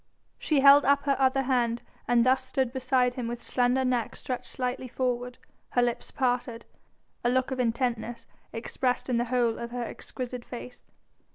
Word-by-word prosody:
She 295 -4 +2
held 280 +1 +8
up 280 0 +3
her 280 -1 +2
other 270 0 +3
hand 240 -3 0 0.2
and 240 -1 +4
thus 260 +1 +3
stood 260 -1 -1
beside 255 -1 +2
him 245 -2 -4
with 240 0 -4
slender 250 +2 +1
neck 245 -3 0
stretched 250 -1 -5
slightly 255 0 -3
forward, 250 0 -2 0.4
her 245 - +4
lips 240 -1 -2
parted, 245 -2 -1 0.6
a 240 - +3
look 255 +1 +1
of 260 - -3
intentness 235 -1 -1 0.3
expressed 250 +3 -2
in 245 - +2
the 240 - +1
whole 240 -2 +1
of 235 0 -5
her 245 0 -4
exquisite 250 +1 -6
face. 245 0 -9
250 Hz, 170 wpm, -28 LUFS, 240-260 Hz, 0.6 s, held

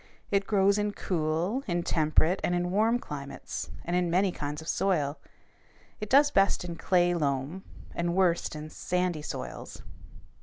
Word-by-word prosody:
It 200 -1 +1
grows 200 -1 +3
in 205 0 0
cool, 170 - -1
in 175 -2 0
temperate, 160 +3 +2
and 175 - +1
in 175 0 -1
warm 220 +5 +3
climates, 140 -10 -6 0.2
and 175 - -1
in 180 -1 +1
many 185 +3 +2
kinds 150 -2 -4
of 160 - -10
soil. 155 -8 0 0.8
It 215 - -5
does 285 +3 +6
best 195 -4 +3
in 170 -1 -5
clay 175 0 +2
loam, 145 +3 -1 0.3
and 170 0 -1
worst 175 -4 +2
in 155 0 -7
sandy 180 -3 -1
soils. - - -7
175 Hz, 155 wpm, -29 LUFS, 155-195 Hz, 0.8 s, does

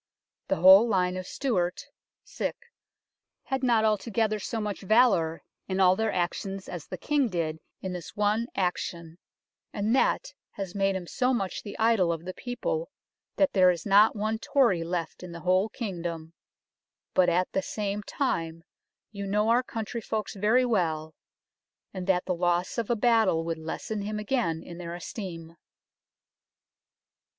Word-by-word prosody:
The - - +1
whole 190 +6 +8
line 185 -4 +1
of 185 0 -5
Stewart 185 -10 -1 1.6
had 265 -1 -2
not 235 -4 +3
altogether 215 0 +1
so 225 +3 -3
much 210 -2 -3
valour 195 -6 +3 0.2
in 190 0 -2
all 185 -1 +6
their 220 +1 0
actions 190 +2 -3
as 175 -4 -7
the 185 - -6
King 285 - +1
did 160 -4 -2 0.2
in 190 -1 -4
this 180 -2 -8
one 210 +3 +1
action, 175 -2 -3 0.5
and 215 +4 0
that - - +1 0.2
has 195 -3 -5
made 195 -1 +1
him 185 -2 -4
so 250 +8 +1
much 195 -5 -3
the 205 - -8
idol 220 -6 +3
of 165 0 -4
the 185 - -5
people 475 - -3 0.5
that 290 -1 +2
there 185 -2 +6
is 175 -2 -1
not 210 +2 +5
one 220 +1 -1
Tory 230 - +2
left 170 -1 -4
in 180 -2 -8
the 170 - -8
whole 185 +3 +2
kingdom, 170 -8 -5 0.8
but 185 -1 +4
at 180 +2 +1
the 190 - 0
same 205 +1 -3
time 165 - -2 0.5
you 200 -2 -5
know 210 +2 +1
our 240 +2 +4
country 230 -2 -5
folks 215 -2 -3
very 220 +5 +3
well, 160 -9 0 0.8
and 185 -1 -5
that 180 -2 +2
the 185 - 0
loss 175 +4 0
of 230 - -3
a 240 - +3
battle 220 -7 +3
would 165 -1 -3
lessen 200 +6 -4
him 210 +1 -3
again 210 -7 -1
in 170 0 -10
their 170 -1 -5
esteem." 170 -3 -7
195 Hz, 160 wpm, -27 LUFS, 175-220 Hz, 1.6 s, whole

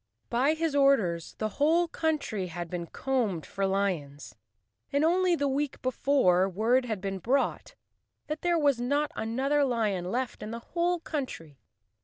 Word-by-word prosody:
By 265 +6 +2
his 320 -1 -1
orders 225 - +2
the 215 - -2
whole 335 +4 +4
country 300 - -2
had 170 0 -6
been 175 -1 -4
combed 230 - -1
for 195 -1 -2
lions 180 -8 -2 0.6
and 285 +2 +2
only 360 +1 +3
the 285 -3 0
week 275 +1 -1
before 255 -8 +3
word 230 +7 +2
had 220 -5 -3
been 195 -1 -3
brought 260 +9 -1 0.5
that 305 +1 -4
there 350 -1 +2
was 285 -6 +2
not 285 +4 0
another 270 +6 +1
lion 220 -8 0
left 240 +5 -3
in 215 - -5
the 230 - -4 0.2
whole 345 +1 +1
country. 165 - -5
255 Hz, 155 wpm, -28 LUFS, 195-290 Hz, 0.6 s, whole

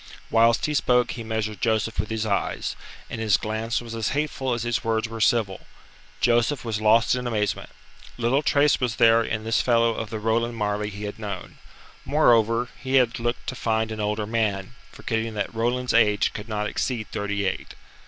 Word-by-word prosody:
Whilst 115 +1 +4
he 150 - -1
spoke 125 -4 +2
he 115 - -6
measured 110 -2 -3
Joseph 110 -1 0
with 105 - -1
his 110 0 -2
eyes, 100 -2 -1 0.3
and 115 - -6
his 110 -3 +3
glance 110 +2 -2
was 115 -1 -8
as 115 -2 -1
hateful 140 -4 -1
as 115 - -3
his 120 -1 -1
words 115 0 0
were 115 0 -7
civil. 105 -4 +1 0.5
Joseph 120 +3 +2
was 110 -2 -2
lost 110 +2 +4
in 125 -1 -2
amazement. 105 -4 -1 0.5
Little 120 +4 +2
trace 145 -1 +3
was 120 -3 0
there 115 0 +5
in 110 -1 -3
this 115 +1 +1
fellow 115 -1 +3
of 110 -1 -5
the 110 - -4
Roland 115 +2 0
Marleigh 105 -1 -1
he 105 +1 -8
had 105 +1 -6
known. 100 -4 -7 0.4
Moreover, 120 -4 +3
he 130 0 -2
had 120 -3 +3
looked 120 +1 -2
to - - -3
find 110 -2 0
an 110 - -5
older 105 0 -1
man, 105 -2 -1 0.2
forgetting 115 -1 -3
that 105 - -3
Roland's 120 +2 0
age 105 -3 +3
could 105 +1 -7
not 105 -1 -1
exceed 110 +1 -2
thirty 100 0 -2
eight. 95 - -3
115 Hz, 190 wpm, -24 LUFS, 105-120 Hz, 0.5 s, there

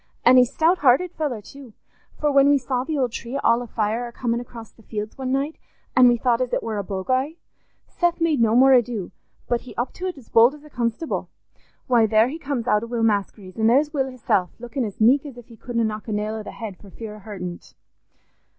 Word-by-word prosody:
An' 250 +2 +7
he's 250 -1 +5
a - - -20
stout 335 +3 +3
hearted 290 +6 +3
feller 270 -9 -3
too, 270 -1 -13 0.5
for 300 -1 +1
when 280 0 +5
we 285 - +5
saw 255 -1 -2
the 305 +2 -3
old 255 -4 0
tree 235 +4 -5
all 230 +1 +3
afire 230 0 -2
a - - -9
comin' 235 -1 -2
across 235 -2 -10
the - - -21
fields 215 -1 -6
one 260 -1 -4
night, 280 +4 -1 0.4
an' 255 -1 +7
we 240 0 +4
thought 240 0 +1
as 250 - -1
it - - 0
war 220 -2 -3
a - - -2
boguy, 255 +10 -1 0.5
Seth 345 -1 0
made 320 -6 +2
no 225 0 +3
more 265 +2 +6
ado, 240 -6 +1 0.4
but 240 -1 0
he 255 - -12
up 240 - -2
to't 365 -3 -5
as 255 - -14
bold 235 +5 +5
as 300 - -16
a 300 - -15
constable. 235 +6 -2 0.6
Why, 235 -3 +4
there 220 +2 +4
he 315 +4 -6
comes 275 -6 -3
out 210 -4 +3
o' 230 - -6
Will 235 -1 -2
Maskery's; 200 -2 -1
an' 220 - +3
there's 290 +6 +3
Will 270 -3 0
hisself, 220 -8 0
lookin' 240 +3 -4
as 205 - -7
meek 250 +6 +5
as 280 -5 -10
if 240 -1 -13
he 230 - -13
couldna 235 +1 -2
knock 215 0 -3
a - - -4
nail 210 +1 -2
o' 220 - -4
the - - -8
head 215 -5 -7
for 200 - -15
fear 215 +1 -8
o' - - -13
hurtin't. 185 -4 -8
240 Hz, 240 wpm, -23 LUFS, 220-270 Hz, 0.6 s, An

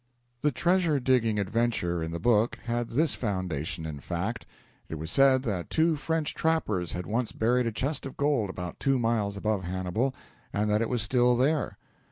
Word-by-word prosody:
The 150 - +2
treasure 170 +1 +2
digging 120 -4 +2
adventure 100 -4 0
in 80 - -3
the 85 - -4
book 115 +1 +3
had 120 0 -1
this 155 +7 +2
foundation 90 - -3
in 75 -3 -5
fact: - - -4 0.4
It - - -4
was 80 +1 -5
said 135 -1 +5
that 100 -8 -3
two 160 0 +3
French 160 +1 -1
trappers 110 - 0
had 90 0 -4
once 115 +4 -1
buried 120 +2 +1
a - - 0
chest 135 +5 -2
of 135 - -11
gold 140 -8 +1
about 90 -1 -6
two 135 -1 +2
miles 110 -4 0
above 105 -1 -1
Hannibal, 95 +9 -1 0.4
and 105 +1 0
that 105 +1 +2
it 115 - 0
was 120 -3 +1
still 125 +1 +3
there. 145 +4 +1
115 Hz, 185 wpm, -28 LUFS, 95-135 Hz, 0.4 s, said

